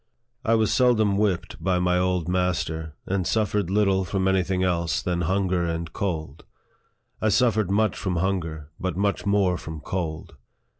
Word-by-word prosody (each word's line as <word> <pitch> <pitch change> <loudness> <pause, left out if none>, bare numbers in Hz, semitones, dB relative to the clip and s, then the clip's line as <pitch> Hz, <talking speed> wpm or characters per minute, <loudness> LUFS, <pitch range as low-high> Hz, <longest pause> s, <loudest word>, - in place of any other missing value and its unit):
I 115 -1 +3
was 110 -1 +2
seldom 110 -5 +3
whipped 100 -3 -1
by 95 -1 +2
my 90 0 +2
old 90 -2 0
master, 85 -4 -1
and 95 -3 -1
suf 110 -3 +1
fered 105 -4 0
little 95 -1 +2
from 95 +1 -1
any 95 0 +3
thing 95 0 -1
else 85 -2 0
than 90 -1 -1
hunger 95 0 +1
and 85 -1 -3
cold. 80 -5 -3 0.8
I 110 - +2
suffered 110 -2 +2
much 105 0 +2
from 95 -2 -2
hunger, 85 -4 -2
but 90 -2 -2
much 100 0 0
more 95 -3 +2
from 80 0 -7
cold. 80 -1 -4
95 Hz, 165 wpm, -25 LUFS, 85-100 Hz, 0.8 s, I